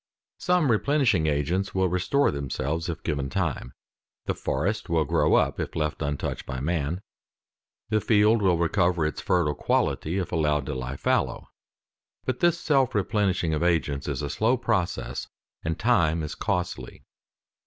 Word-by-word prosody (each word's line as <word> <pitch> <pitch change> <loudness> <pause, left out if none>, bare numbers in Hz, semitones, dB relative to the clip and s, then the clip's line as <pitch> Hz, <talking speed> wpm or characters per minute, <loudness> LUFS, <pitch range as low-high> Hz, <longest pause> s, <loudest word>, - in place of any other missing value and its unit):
Some 180 -7 +2
replenishing 115 - +2
agents 85 +8 -1
will 95 0 +3
restore 90 +11 +2
themselves 70 +4 -3
if 85 - -5
given 70 -4 -2
time; 65 -1 -2 0.5
the - - 0
forest - - -2
will 80 -2 +2
grow - - +3
up - - +2
if - - -4
left 75 -1 -2
untouched 75 -1 -3
by 65 -1 -4
man; 80 +4 -2 0.9
the 110 -1 +2
field 105 +1 +4
will 90 -4 +3
recover 85 0 +1
its 75 - -3
fertile 85 -5 +1
quality 80 +4 0
if 95 - -2
allowed 75 -4 +1
to 75 - -3
lie 65 +1 -4
fallow. - - 0 0.8
But 130 -1 -2
this 175 -1 +3
self 135 -8 +2
replenishing 95 -5 +1
of 75 - -1
agents 80 -5 0
is - - -2
a 70 - -2
slow 115 - +2
process, 110 -7 -2 0.4
and 80 0 -2
time 85 -9 +2
is 75 - -4
costly. 95 -5 -3
85 Hz, 155 wpm, -26 LUFS, 75-105 Hz, 0.9 s, field